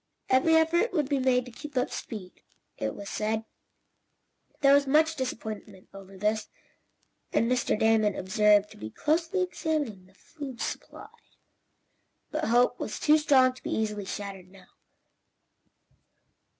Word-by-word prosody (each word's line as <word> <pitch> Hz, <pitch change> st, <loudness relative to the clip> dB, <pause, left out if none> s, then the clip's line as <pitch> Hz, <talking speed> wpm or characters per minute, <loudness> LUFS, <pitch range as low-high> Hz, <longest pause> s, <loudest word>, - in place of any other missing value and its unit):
Every 270 Hz, +5 st, +4 dB
effort 340 Hz, +7 st, +3 dB
would 300 Hz, -6 st, +1 dB
be 280 Hz, -1 st, 0 dB
made 255 Hz, -1 st, +2 dB
to 250 Hz, -, -10 dB
keep 295 Hz, +3 st, -9 dB
up 250 Hz, -, 0 dB
speed, 190 Hz, -5 st, -8 dB, 0.3 s
it 110 Hz, -, -3 dB
was 200 Hz, -, -8 dB
said. 220 Hz, +2 st, -2 dB, 1.2 s
There 275 Hz, -1 st, +6 dB
was 280 Hz, 0 st, +4 dB
much 315 Hz, +3 st, +3 dB
disappointment 220 Hz, -7 st, -6 dB
over 195 Hz, 0 st, -12 dB
this, 210 Hz, +2 st, -1 dB, 0.8 s
and -, -, +2 dB
Mr. 245 Hz, -2 st, +1 dB
Damon 220 Hz, -2 st, +3 dB
was -, -, -6 dB
observed 210 Hz, +2 st, +3 dB
to -, -, -14 dB
be 110 Hz, -, -7 dB
closely 335 Hz, -, 0 dB
examining 300 Hz, -, -3 dB
the 190 Hz, -, -25 dB
food 275 Hz, -3 st, -9 dB
supply, 430 Hz, -, -6 dB, 1.2 s
but -, -, -2 dB
hope 245 Hz, +2 st, +3 dB
was -, -, -4 dB
too 305 Hz, +1 st, +4 dB
strong 260 Hz, -4 st, +4 dB
to 255 Hz, -, -16 dB
be -, -, -6 dB
easily 210 Hz, -2 st, -2 dB
shattered 195 Hz, -2 st, -7 dB
now. 190 Hz, -1 st, -18 dB
245 Hz, 145 wpm, -28 LUFS, 210-295 Hz, 1.2 s, There